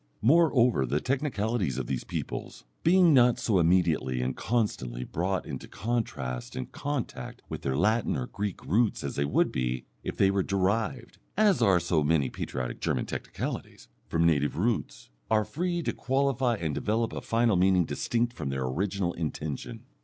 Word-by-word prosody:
Moreover, 125 - +4
the 70 +5 +1
technicalities 115 - -1
of 65 - -2
these 65 0 -3
peoples, - - -5 0.2
being 175 -1 +6
not 125 -2 +5
so 100 -5 +1
immediately 80 -7 +2
and 65 0 -2
constantly 65 - -1
brought 90 +6 -2
into - - -6
contrast 65 - -3
and 65 - -5
contact 145 -3 -4
with - - -5
their 65 0 -1
Latin 110 +6 +2
or 65 - -2
Greek 100 +4 -5
roots 110 +3 +1
as - - -4
they 70 - +1
would 70 - +2
be 65 -1 -2 0.2
if - - -4
they 95 - +4
were 100 0 +1
derived 105 +6 -1 0.2
(as 205 - +4
are 95 -5 +5
so 85 -2 +1
many 75 -3 +2
"patriotic" 60 -1 -4
German 60 - 0
technicalities) - - -5 0.2
from 80 0 +1
native 75 -3 +2
roots, 110 - -2 0.2
are 110 -1 +3
free 175 - -2
to - - -1
qualify 135 -2 +1
and 80 -7 -2
develop 110 +7 0
a - - -4
final 115 -2 +2
meaning 90 -1 +4
distinct 120 +6 -1
from 75 - -4
their 65 -1 -2
original 90 +6 -1
intention. 75 -3 -5
95 Hz, 165 wpm, -28 LUFS, 75-120 Hz, 0.2 s, being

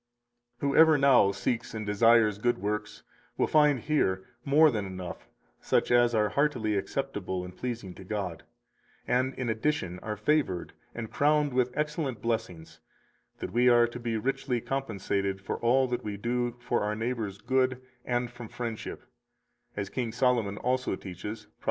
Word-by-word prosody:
252 140 -1 0
Whoever 160 -1 +7
now 135 -8 +5
seeks 115 +4 -2
and 110 -1 -4
desires 105 0 +4
good 120 +2 +1
works 105 0 -4 0.3
will - - +3
find 150 -4 +4
here 95 -11 0 0.2
more 150 +2 +5
than 110 -4 -2
enough 90 -10 -7 0.3
such - - +1
as 120 -1 +4
are 105 -1 +3
heartily 120 -4 +1
acceptable 100 -5 -3
and 90 0 -10
pleasing 120 -6 -5
to 95 - -12
God, 95 -4 -4 0.7
and 130 +2 +1
in 125 - -3
addition 110 - -1
are 105 +2 -5
favored 105 - 0 0.2
and 115 -2 -5
crowned 150 -1 +2
with 125 -1 +2
excellent 150 -5 -2
blessings, 110 -8 -3 0.6
that - - -5
we 125 +2 +5
are 120 -1 +6
to 120 +1 -6
be 115 -2 -2
richly 125 +1 -1
compensated 100 -7 -2
for 95 - -4
all 130 +3 +3
that 125 0 -3
we 105 -1 -4
do 120 +2 -1
for 120 - -1
our 105 +1 -1
neighbor's 115 -3 -3
good 130 +3 +1 0.2
and 120 0 -1
from 120 -1 -9
friendship; 115 -3 -5 0.7
as 100 -1 -3
King 120 -3 -2
Solomon 120 -4 +1
also 130 -2 0
teaches 105 +4 -7
Prov. - - -32
120 Hz, 160 wpm, -29 LUFS, 105-130 Hz, 0.7 s, Whoever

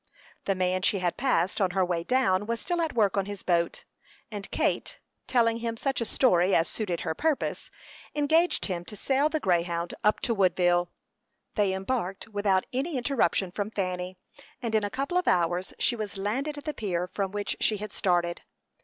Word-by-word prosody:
The 195 - +1
man 185 0 +1
she 195 - +3
had 180 -2 0
passed 245 -7 +1
on 190 - +3
her 185 - +4
way 175 -2 -1
down 205 -4 +2
was 230 0 -1
still 350 -1 -1
at 325 -2 -1
work 205 -4 +3
on 195 0 +1
his 205 -1 -6
boat, 170 -2 0 0.5
and 205 -2 -6
Kate, - - -1 0.3
telling 230 -2 +3
him 230 -1 -3
such 270 +1 -1
a - - 0
story 190 -7 +3
as 165 - +3
suited 185 -6 -3
her - - -1
purpose, 310 - -1 0.5
engaged 315 +4 +3
him 175 -3 -3
to 210 - -8
sail 275 +7 +2
the 315 0 -1
Greyhound 170 - 0
up 210 0 +3
to 235 - +1
Woodville. 175 -3 +3 0.6
They 205 -3 +2
embarked 195 +1 -2
without 205 -3 +1
any 275 +4 -1
interruption 245 -7 +1
from 205 +3 -3
Fanny, 185 -3 -3 0.4
and 235 -3 -3
in 215 -1 +3
a 205 - -1
couple 275 - 0
of 360 - -4
hours 175 +1 +2
she 240 - +2
was 215 -3 -5
landed 265 +10 -2
at 290 - -7
the 305 - -3
pier 180 -7 -1
from 195 +1 -2
which 205 0 -2
she 215 - +2
had 210 0 -6
started. 175 -3 +1
205 Hz, 190 wpm, -28 LUFS, 180-245 Hz, 0.6 s, her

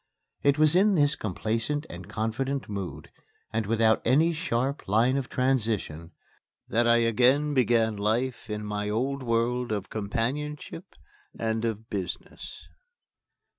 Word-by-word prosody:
It 140 0 +3
was 155 +1 +4
in 200 +2 +4
this 145 -2 +3
complacent 115 - -2
and - - -10
confident 130 +5 -2
mood, 100 -3 -6 0.4
and 110 -2 -1
without 110 0 +3
any 160 +6 +3
sharp 140 -4 -2
line 115 +6 +3
of 135 -2 -2
transition, 110 - -1 0.6
that 120 +1 +2
I 115 - +6
again 125 +6 +3
began 115 -4 +2
life 115 +3 -1
in 105 0 -4
my 105 0 -2
old 135 +6 -1
world 120 0 0
of 105 -2 -3
companionship 120 +8 -4 0.4
and 110 0 -1
of 110 -1 -3
business. 95 -4 -6
115 Hz, 130 wpm, -27 LUFS, 110-135 Hz, 0.6 s, I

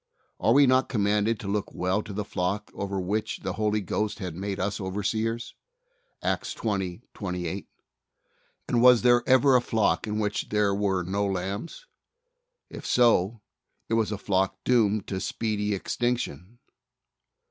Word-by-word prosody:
Are 110 - +3
we 140 +2 +7
not 130 0 +3
commanded 105 0 +1
to 100 - -6
look 100 0 -2
well 95 +3 0
to 110 - -9
the 105 +1 -3
flock 100 +2 -2
over 100 -1 -3
which 105 +4 -2
the - - -2
Holy 105 -1 0
Ghost 105 +2 -2
hath 90 -5 -5
made 100 +3 -4
us 100 +2 -2
overseers? 110 +4 -2 0.7
(Acts - - -1
20: 100 -1 -2
28) 90 -1 -4 1.0
and 120 - +2
was 125 -1 +7
there 120 -1 +5
ever 130 +1 +6
a 125 - +5
flock 110 -2 +1
in 105 0 -2
which 105 -1 -1
there 105 -1 +2
were 100 -2 0
no 100 +3 -1
lambs? 100 - -4 0.8
If - - -9
so 115 -3 +3 0.5
it - - -1
was 110 -1 +1
a 105 - -2
flock 95 -1 0
doomed 110 -4 +2
to 95 - -3
speedy 105 -1 -1
extinction. 115 - -3
105 Hz, 150 wpm, -27 LUFS, 95-115 Hz, 1.0 s, we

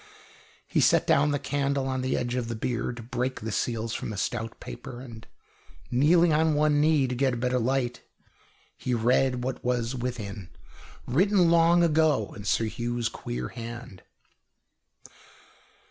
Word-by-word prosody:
He - - 0
set - - +4
down 145 +1 +3
the 145 - +1
candle 140 -1 -1
on 130 -1 -1
the 130 0 0
edge 120 0 -2
of 125 -2 -2
the 115 - -3
bier 120 +2 -2
to 120 -1 -8
break 125 +2 -3
the 110 +1 -4
seals 115 +1 -2
from - - -4
the 105 - -5
stout 115 +2 -3
paper. 90 - -8
And, 115 -3 -11 0.6
kneeling 160 +6 +4
on 155 0 +3
one 150 0 +3
knee, 150 -3 +3
to 125 - -3
get 130 0 +1
a - - -4
better 125 +1 0
light, 125 0 -1 0.7
he 125 - -2
read 125 +2 +2
what 130 +1 -4
was 120 -1 0
within, 110 -7 -5 0.6
written 180 +5 +3
long 170 +1 +5
ago 155 -8 +2
in 100 - -9
Sir 115 - +1
Hugh's 120 +1 -2
queer 60 - -5
hand. 115 -4 -8
125 Hz, 160 wpm, -27 LUFS, 115-145 Hz, 0.7 s, long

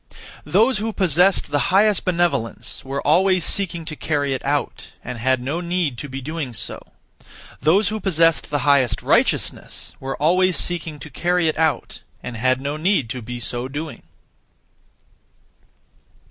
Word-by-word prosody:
(Those 230 +1 +3
who) 220 +1 -3
possessed 180 -2 +2
the 145 -1 +1
highest 205 +2 +3
benevolence 170 -11 -1
were 135 +1 -4
(always 185 +2 +3
seeking) 170 -4 -1
to 155 -1 -6
carry 145 -3 -1
it 130 - -4
out, - - -2 0.2
and 125 -1 -6
had 130 +2 +2
no 140 +8 -3
need 170 -8 -1
to 145 - -6
be 135 +1 -5
doing 145 -3 -5
so. 110 - -4 0.7
(Those 180 +9 +3
who) 215 +1 -3
possessed 165 -4 +2
the 145 -4 -1
highest 140 -3 +3
righteousness - - 0
were 135 0 -5
(always 180 +4 +3
seeking) 165 -3 -1
to 160 - -9
carry 175 +4 +1
it 155 - -1
out, 160 -3 -1 0.2
and 120 - -6
had 130 +3 +1
need 145 - 0
to 130 -1 -5
be 120 +2 -6
so 120 +2 -1
doing. 145 +3 -6
155 Hz, 150 wpm, -21 LUFS, 130-180 Hz, 0.7 s, Those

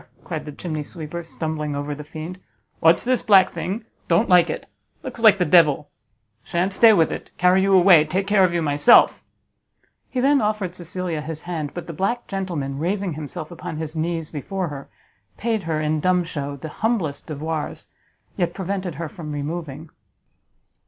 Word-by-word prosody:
cried 155 -4 -5
the 150 - -6
chimney 155 0 -5
sweeper, 160 +2 -7
stumbling 155 -2 -4
over 145 +1 -3
the 150 +1 -8
fiend, 160 +4 -8 0.4
"what's 165 +1 +4
this 255 0 +1
black 195 -5 +5
thing? 215 +5 -4 0.2
Don't 170 0 +3
like 180 -2 +5
it; - - -5 0.4
looks 255 -3 -7
like 220 -3 +6
the 180 - +1
devil. 150 -3 +4 0.5
You - - -23
shan't 180 +3 0
stay 225 +3 +7
with 165 -7 +3
it; - - -6
carry 180 +1 +4
you 195 0 +2
away; 180 -4 +7
take 185 +5 -1
care 200 -1 +4
of 180 - +3
you 170 -1 0
myself." 145 +10 +5 0.9
He 255 - -3
then 275 +1 +4
offered 210 -4 -1
Cecilia 175 -2 -4
his 155 +1 -6
hand; 160 -5 -4
but 175 - -5
the 165 - -7
black 200 +9 -1
gentleman, 170 -9 -4
raising 190 +2 -1
himself 155 +2 -7
upon 175 -2 -6
his 160 0 -5
knees 165 0 -2
before 180 +4 -3
her, 140 -1 -8 0.5
paid 225 -2 -1
her, 155 -1 0
in 155 0 0
dumb 180 +2 +2
shew, 145 -4 -5
the 155 +4 -7
humblest 200 -11 -1
devoirs, 155 0 -4 0.5
yet 175 -2 -1
prevented 190 -3 -3
her 165 +2 -4
from 155 -1 -8
removing. 150 +1 -5
170 Hz, 180 wpm, -22 LUFS, 155-190 Hz, 0.9 s, stay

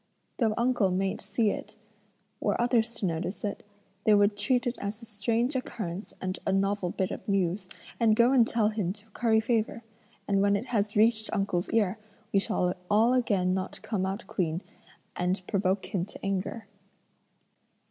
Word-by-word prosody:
Though 220 -4 +2
uncle 235 -5 +2
mayn't 190 +1 -1
see 205 +1 +1
it, - - -7 0.6
were - - 0
others 235 -1 +2
to - - -2
notice 175 +3 -3
it, 205 -1 -3 0.4
they 215 - +6
would 205 0 +4
treat 250 +5 +1
it 245 0 -1
as 205 +2 -4
a 230 - -11
strange 230 +5 0
occurrence 205 -7 -4
and 185 0 -3
a - - 0
novel 195 -1 +1
bit 190 +3 -1
of - - -7
news, 185 -1 0 0.3
and 225 -2 +4
go 235 +2 +5
and 245 -4 +5
tell 220 -2 +2
him 205 -5 -1
to 205 +1 -13
curry 225 0 +2
favour, 225 0 0 0.4
and 195 -1 +2
when 200 0 +4
it 205 +4 -2
has 210 -3 0
reached 220 0 +3
uncle's 195 -4 0
ear, 215 -2 +1 0.3
we 200 - +5
shall 180 -4 +1 0.2
all 220 +4 +4
again 200 -8 +2
not 190 0 -3
come 190 -4 -1
out 195 +3 -4
clean, 170 -2 -2 0.5
and 180 +1 -1
provoke 190 0 0
him 185 -4 +1
to 200 - -9
anger." 195 +3 -2
205 Hz, 175 wpm, -28 LUFS, 190-225 Hz, 0.6 s, they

